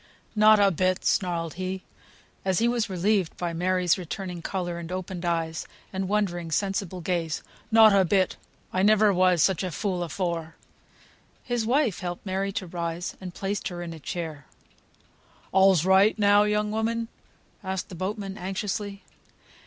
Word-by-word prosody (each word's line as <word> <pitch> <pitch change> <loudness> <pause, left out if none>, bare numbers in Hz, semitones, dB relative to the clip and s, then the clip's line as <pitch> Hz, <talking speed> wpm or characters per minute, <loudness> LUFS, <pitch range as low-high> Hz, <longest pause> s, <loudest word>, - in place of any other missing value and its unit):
"Not 215 0 +6
a 200 -1 +5
bit!" 185 +2 0
snarled 170 -4 0
he, 185 0 -3 0.6
as 190 -2 +1
he 230 - +3
was 235 -2 0
relieved 190 -1 0
by 175 -1 -2
Mary's 180 +1 +1
returning 180 0 -5
colour, 175 -1 -3
and 170 0 -7
opened 185 -1 -5
eyes, 165 -1 -1 0.3
and 190 0 -2
wondering, 180 -5 0
sensible 195 +1 -1
gaze; 165 -2 -2 0.3
"not 220 -2 +7
a 195 -1 +5
bit! 185 +1 +2 0.4
I 185 - +1
never 210 0 +5
was 180 -3 +4
such 190 -3 +2
a 185 - -2
fool 185 +1 -2
afore." 170 -2 -3 0.9
His 240 -3 -1
wife 250 - +2
helped 175 0 -5
Mary 195 +1 -1
to 190 - -3
rise, 170 0 -4
and 180 -2 -7
placed 200 +1 -2
her 175 -1 -5
in 170 -1 -6
a 160 - -10
chair. 155 -3 -5 1.0
"All's 190 -3 +5
right 190 +4 +5
now, 205 0 +5
young 210 0 0
woman?" 225 +1 -1 0.6
asked 190 0 -3
the - - -10
boatman, 195 +2 -4
anxiously. 200 +2 -4
190 Hz, 155 wpm, -26 LUFS, 175-205 Hz, 1.0 s, not